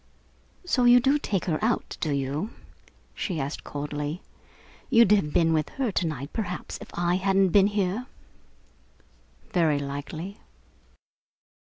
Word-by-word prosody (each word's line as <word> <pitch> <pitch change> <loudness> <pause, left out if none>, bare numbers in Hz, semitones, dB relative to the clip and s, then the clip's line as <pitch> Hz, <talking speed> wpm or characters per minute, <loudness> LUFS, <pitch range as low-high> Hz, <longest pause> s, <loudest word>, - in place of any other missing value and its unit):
"So 255 -8 +2
you 245 0 +8
do 275 +4 +3
take 200 - -2
her 160 +1 -1
out, 230 +1 0
do 160 - 0
you?" 140 +7 -1 0.6
she 175 -6 -3
asked 140 +1 -4
coldly. 145 +3 -4 0.7
"You'd 230 -6 +6
have 195 -8 +3
been 165 +1 +3
with 155 -2 0
her 260 -5 0
to 180 -2 0
night, 140 -2 -5
perhaps, 180 -5 -4
if - - -10
I 175 +1 +1
hadn't 195 0 +3
been 195 +2 +5
here?" 205 +4 -1 1.4
"Very 165 -7 +3
likely." 145 +7 -5
180 Hz, 135 wpm, -26 LUFS, 150-210 Hz, 1.4 s, you